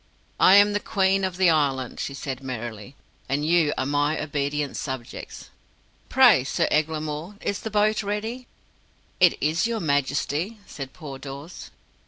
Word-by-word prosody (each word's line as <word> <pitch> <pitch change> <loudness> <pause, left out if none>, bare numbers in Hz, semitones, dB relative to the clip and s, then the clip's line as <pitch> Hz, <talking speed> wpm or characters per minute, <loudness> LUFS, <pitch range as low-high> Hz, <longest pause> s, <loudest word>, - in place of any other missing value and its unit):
"I 190 - +7
am 205 0 +6
the 205 - +1
Queen 195 -2 +1
of 185 -1 -2
the 185 -3 +5
Island," 135 -5 0
she 140 - -4
said 135 -1 -5
merrily, 120 -2 -6 0.3
"and 145 +2 0
you 165 -2 +3
are 130 - 0
my 145 +2 +1
obedient 145 -1 -2
subjects. 130 -4 -7 0.6
Pray, - - +6
Sir - - 0
Eglamour, 155 +3 -1
is 200 - -2
the 220 - -5
boat 215 +1 +2
ready?" 220 +5 -4 0.7
"It 180 -2 +5
is, 160 +9 +1
your 230 -1 -2
Majesty," 145 - -1
said 135 -3 -8
poor 140 -3 -9
Dawes. 140 +5 -9
155 Hz, 150 wpm, -24 LUFS, 140-195 Hz, 0.7 s, I